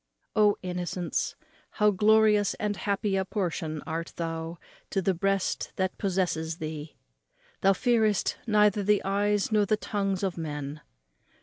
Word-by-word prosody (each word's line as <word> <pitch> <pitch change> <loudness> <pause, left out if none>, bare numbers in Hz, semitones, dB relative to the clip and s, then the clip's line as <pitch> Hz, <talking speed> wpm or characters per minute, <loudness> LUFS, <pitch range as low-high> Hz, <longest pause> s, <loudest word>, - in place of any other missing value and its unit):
O 210 -1 +4
innocence, 180 -1 -2 0.4
how 210 0 +4
glorious 210 0 +4
and 210 -1 -2
happy 200 0 -1
a 190 - +1
portion 170 -6 -3
art 165 +1 -4
thou 165 0 -4 0.3
to 195 - 0
the 190 0 +1
breast 195 +2 -1
that 185 -1 -1
possesses 175 -4 -1
thee! 155 -1 -6 0.7
thou 195 0 +5
fearest 220 -2 +2
neither 210 -1 +4
the 205 +1 +2
eyes 205 +2 +1
nor 210 -2 +3
the 215 - +2
tongues 195 -2 -2
of 185 -3 -1
men. 150 -2 -5
195 Hz, 135 wpm, -28 LUFS, 170-210 Hz, 0.7 s, thou